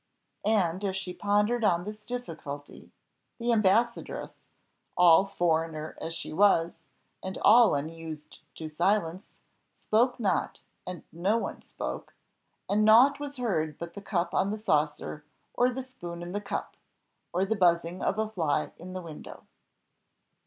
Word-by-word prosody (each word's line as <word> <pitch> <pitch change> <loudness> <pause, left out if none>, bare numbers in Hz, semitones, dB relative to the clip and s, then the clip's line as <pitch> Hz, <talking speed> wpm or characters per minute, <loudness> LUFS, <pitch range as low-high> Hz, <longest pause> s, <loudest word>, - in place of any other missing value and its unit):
And, 190 -4 +2
as 190 -1 -1
she 190 -2 -4
pondered 210 +4 +1
on 175 -4 +3
this 210 +2 -8
difficulty, 160 -12 -7 0.5
the 235 0 +1
ambassadress, 225 +3 +1 0.6
all 180 +2 +7
foreigner 160 -4 -1
as 165 0 -3
she - - -5
was, 170 -2 +3 0.4
and 190 0 -5
all 230 -3 +7
unused 155 0 -6 0.2
to 160 - -6
silence, 175 +2 -1 0.4
spoke 240 +4 +1
not, 195 -7 -1 0.2
and 180 -3 -6
no 190 +7 +1
one - - -4
spoke: - - -6 0.5
and 210 +1 +2
nought 245 +7 +6
was 285 -1 -6
heard 160 - -1
but 170 0 -7
the 200 - -8
cup 175 -3 -1
on 195 - +2
the 210 - -2
saucer, 150 -5 -1 0.3
or 245 +1 +3
the 255 +1 -4
spoon 175 -10 -8
in 175 - -6
the 205 +2 -3
cup, - - -4 0.6
or 185 +2 +1
the 220 +3 0
buzzing 175 -2 +2
of 200 - 0
a 220 0 0
fly 160 -8 -1
in 180 +2 -9
the 185 -1 -5
window. 160 -3 -10
185 Hz, 145 wpm, -28 LUFS, 165-215 Hz, 0.6 s, all